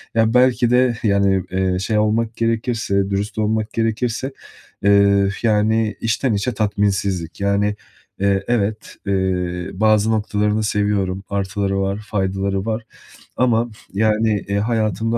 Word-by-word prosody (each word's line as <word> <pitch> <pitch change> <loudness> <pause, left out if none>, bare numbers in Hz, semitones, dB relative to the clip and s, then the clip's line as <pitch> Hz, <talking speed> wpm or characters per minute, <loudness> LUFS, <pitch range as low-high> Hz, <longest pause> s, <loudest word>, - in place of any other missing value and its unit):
ya, 115 0 +3
belki 125 -1 +4
de 125 -1 +3
yani, 100 -3 +2
eee, 95 0 0
şey 105 +3 -1
olmak 110 +2 +1
gerekirse, 115 -4 0
dürüst 100 +2 -2
olmak 110 0 -1
gerekirse, 115 +3 -1 0.5
eee, 100 -1 +4
yani 110 0 +2
içten 115 +2 0
içe 100 +5 0
tatminsizlik. 100 -5 -1
Yani, 100 +1 +1 0.4
eee, 100 0 +1
evet, 110 -2 -1
eee, 90 -2 -1
bazı 110 +2 +3
noktalarını 105 0 0
seviyorum. 100 -2 0
Artıları 100 0 -1
var, 100 +1 -1
faydaları 95 -1 -1
var 110 0 -2 0.5
ama 120 -1 +2 0.2
yani, 110 +1 +2
eee, 100 0 -1
hayatımda 110 +1 0
105 Hz, 125 wpm, -20 LUFS, 100-110 Hz, 0.5 s, belki